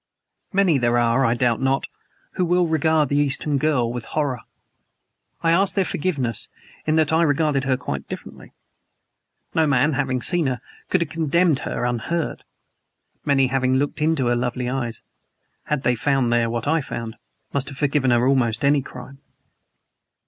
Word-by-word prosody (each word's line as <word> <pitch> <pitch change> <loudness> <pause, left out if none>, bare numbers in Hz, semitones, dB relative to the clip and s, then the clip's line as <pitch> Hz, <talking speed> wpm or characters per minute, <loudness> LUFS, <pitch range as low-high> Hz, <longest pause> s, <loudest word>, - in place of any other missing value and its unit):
Many 190 -7 +3
there 120 0 +2
are, 120 +2 +2
I 115 -2 +2
doubt 120 -1 +1
not, 135 0 +1 0.5
who 185 - -1
will 175 0 +2
regard 160 -1 +2
the 145 - 0
Eastern 145 0 +2
girl 130 -6 +1
with 120 -2 -5
horror. 140 -5 -2 1.0
I 165 - +3
ask 190 +3 +3
their 195 -2 +2
forgiveness 140 - -2 0.4
in 155 - +2
that 160 -1 +2
I 160 - +4
regarded 145 -3 +1
her 130 -1 +1
quite 70 - -5
differently. - - -9 1.0
No 160 -1 +2
man 145 +2 +2
having 130 -3 -1
seen 175 -5 +2
her 125 -2 -2 0.3
could 185 - +2
have 160 -4 -2
condemned 165 -1 +2
her - - -3
unheard. 125 +7 -2 0.8
Many, 135 -2 +3
having 130 -1 +1
looked 145 +3 -1
into 155 -4 +1
her 120 0 +2
lovely 125 +1 -2
eyes, 120 -3 -3 0.6
had 150 -2 -2
they 125 - +3
found 130 0 +1
there 115 -1 +2
what 120 +2 -3
I 160 +1 +2
found, 115 -4 -6 0.4
must 140 -1 -1
have 135 - -10
forgiven 140 -2 +1
her 120 +1 +3
almost 125 -3 +1
any 140 0 +4
crime. 135 +1 -11
135 Hz, 165 wpm, -22 LUFS, 125-155 Hz, 1.0 s, I